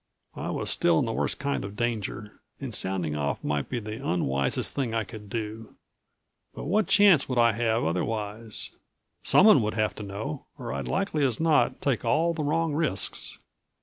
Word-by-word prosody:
I - - -4
was - - -2
still - - +4
in - - +2
the - - -2
worst - - -1
kind 140 0 -2
of 100 +1 -7
danger, 110 -2 -3 0.2
and 135 -4 -6
sounding 95 -6 -1
off 70 -1 -2
might 75 -1 -1
be 125 - -2
the 110 +3 -7
unwisest 70 - 0
thing 125 -5 -2
I 115 - +1
could 105 +1 -11
do. 110 0 -5 0.8
But - - -6
what 205 +7 +1
chance 200 -10 +5
would 125 - -1
I 115 0 +5
have 115 +1 0
otherwise? 105 +5 -2 0.5
Someone 210 - +6
would 105 0 -2
have 110 -1 +1
to - - -6
know 105 +8 -6
or 120 -4 -5
I'd - - -4
likely 190 -6 0
as 125 -5 +1
not 160 -2 +2
take 135 -4 0
all 155 +8 +2
of 170 - -6
the 155 - -1
wrong 160 +2 0
risks. 145 - 0
115 Hz, 185 wpm, -27 LUFS, 105-145 Hz, 0.8 s, Someone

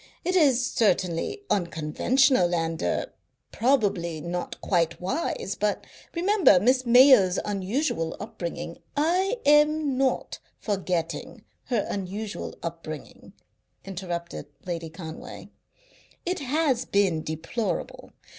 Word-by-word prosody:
It 365 +2 +1
is 270 -8 +4
certainly 200 - 0
unconventional 175 - +2
and 165 0 -2
er - - -1 0.4
probably 200 - +1
not 175 +3 -4
quite 170 -4 0
wise, 200 - -2
but 210 0 -1 0.3
remember 360 - +5
Miss 255 +5 +2
Mayo's 240 -7 +7
unusual 200 - -1
upbringing 170 -4 -6
" - - -21
"I 365 +9 +2
am 295 -2 +4
not 270 -1 0 0.2
forgetting 180 -5 -3 0.2
her 235 -5 0
unusual 200 +2 -5
upbringing," 165 -3 -7 0.5
interrupted 175 -3 -5 0.2
Lady 170 -2 -4
Conway. 160 -1 -9 0.8
"It 360 +1 -1
has 280 -2 0
been 190 -6 +2
deplorable. 160 +9 -4
200 Hz, 100 wpm, -26 LUFS, 170-270 Hz, 0.8 s, Mayo's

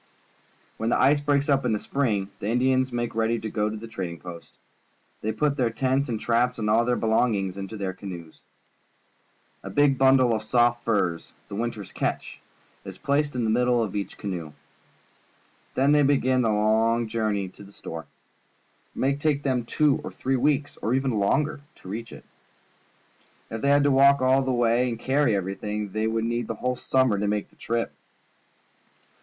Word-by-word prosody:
When 110 - -1
the - - +2
ice 145 +3 +4
breaks 145 -1 +1
up 140 -2 +2
in 120 -3 +1
the 105 - 0
spring, 105 -9 -1
the 100 - -4
Indians 130 +2 +2
make 120 -1 -2
icady 115 +1 0
to 110 - -4
go 105 -1 0
to 110 - -5
the 115 +2 -8
trading 90 -6 -5
post. 85 -2 -10 0.7
They 110 - -1
put 145 +3 0
their 125 -4 +2
tents 130 +3 0
and 115 -2 -2
traps 120 +2 +1
and 110 -2 -2
all 115 +2 +4
their 125 0 +1
belongings 110 -5 +1
into 100 +2 -6
their 95 -2 -3
canoes. 90 -4 -9 1.2
A - - -7
big 145 -2 +3
bundle 130 -2 +5
of 110 - -1
soft 120 +1 +2
furs 95 -8 -1
— - - -36
the - - -6
winter's 110 -3 -4
catch - - -3 0.2
— - - -35
is - - -9
placed 145 0 0
in 125 - -1
the 110 - +1
middle 120 0 +2
of 105 -2 -5
each 100 -1 -4
canoe. 85 -6 -5 1.2
Then 135 +2 +3
they 150 0 +5
begin 130 -2 +3
the 115 - +1
long 110 +2 +2
journey 110 -3 -1
to 100 - -14
the 100 - -14
store. 80 -5 -8 0.9
It - - -8
may 135 +1 +2
take 145 0 0
them 130 -4 0
two 145 +3 +2
or - - -6
three 135 +1 -1
weeks, 145 +2 0
or 115 +4 -1
even 135 0 0
longer, 140 +8 0
to - - -15
reach 115 +4 -6
it. - - -12 1.3
If 110 0 -4
they 140 - +1
had 145 0 +5
to 145 - +3
walk 140 +1 +6
all 130 +1 +3
the 130 0 -1
way 120 0 +2
and 115 - -4
carry 130 -2 +2
everything, 100 +2 -3
they 110 +2 -1
would 115 0 -1
need 120 0 -2
the 115 - -3
whole 125 +4 -1
summer 130 -5 +1
to 105 - -1
make 105 0 -2
the - - -25
trip. 115 0 -2
115 Hz, 195 wpm, -25 LUFS, 105-130 Hz, 1.3 s, walk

